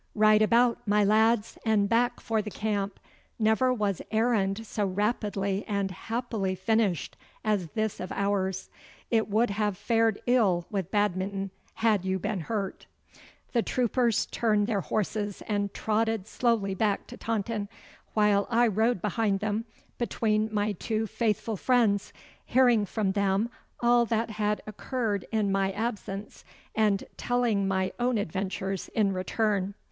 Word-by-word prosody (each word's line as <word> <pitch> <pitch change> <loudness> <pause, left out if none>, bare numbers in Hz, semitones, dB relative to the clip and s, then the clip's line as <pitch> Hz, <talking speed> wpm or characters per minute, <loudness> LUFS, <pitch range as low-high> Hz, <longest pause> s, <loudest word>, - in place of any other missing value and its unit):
Right 215 0 +5
about, 235 +2 +4
my 210 +1 +4
lads, 220 +2 +2
and 215 -3 +3
back 240 +2 +2
for 225 -2 0
the 210 - -6
camp. 205 -2 -2 0.4
Never 220 +3 +3
was 205 -6 -1
errand 220 -2 +1
so 210 0 -2
rapidly 200 0 -1
and 200 -2 -1
happily 220 -1 -3
finished 205 -2 0 0.3
as 205 -5 +1
this 220 -1 -1
of 185 - -5
ours. 190 -2 -1 0.4
It 225 -2 +2
would 220 +2 +2
have 205 -1 -1
fared 225 -1 +2
ill 205 -9 +3
with 195 -4 -2
Badminton 195 -1 -1 0.2
had 215 -4 +2
you 190 0 0
been 205 +2 -2
hurt.' 195 +2 -4 0.7
The 235 - +3
troopers 240 -1 +1
turned 210 -3 +2
their 205 -3 0
horses 210 0 -2
and 205 -2 0
trotted 220 -2 0
slowly 220 -4 0
back 205 +1 0
to - - -10
Taunton, 215 -2 -2 0.5
while 210 -2 +3
I 240 +1 +4
rode 220 -1 +1
behind 210 -1 +1
them 215 +2 -1 0.3
between 220 -2 0
my 210 0 0
two 220 +3 -2
faithful 220 -1 -1
friends, 225 -4 +2 0.4
hearing 240 -5 +4
from 205 -1 0
them 200 +3 +1 0.3
all 240 0 +4
that 225 0 0
had 210 0 -1
occurred 215 -2 -3
in 215 -3 +1
my 195 0 +1
absence, 205 -1 -4 0.3
and 210 -2 +2
telling 235 -5 +1
my 190 -1 0
own 245 -1 +1
adventures 195 0 -3
in 205 -3 +2
return. 200 +1 -1
210 Hz, 140 wpm, -28 LUFS, 195-225 Hz, 0.7 s, Right